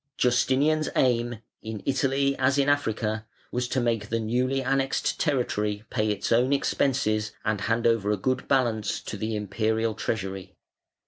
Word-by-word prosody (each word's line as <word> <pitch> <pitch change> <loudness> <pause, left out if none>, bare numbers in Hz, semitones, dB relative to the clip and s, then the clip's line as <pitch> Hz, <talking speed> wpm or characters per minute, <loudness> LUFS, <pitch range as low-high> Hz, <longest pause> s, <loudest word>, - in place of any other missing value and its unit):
Justinian's 135 +5 +2
aim, 120 -3 +1 0.2
in 110 -2 -6
Italy 140 0 +1
as 135 +1 +3
in 140 0 +3
Africa, 110 -6 0 0.2
was 125 0 -1
to 130 - 0
make 115 -4 0
the 115 - 0
newly 125 +4 0
annexed 135 +1 0
territory 105 -8 0
pay 110 -3 0
its 105 -1 -2
own 120 +3 +3
expenses 110 -6 +1
and 105 -2 0
hand 115 +2 0
over 115 -3 +2
a 105 - +2
good 130 +6 -1
balance 115 -6 +1
to - - -6
the 110 +2 -3
Imperial 110 +2 0
treasury. 95 -4 -4
115 Hz, 150 wpm, -26 LUFS, 110-130 Hz, 0.2 s, as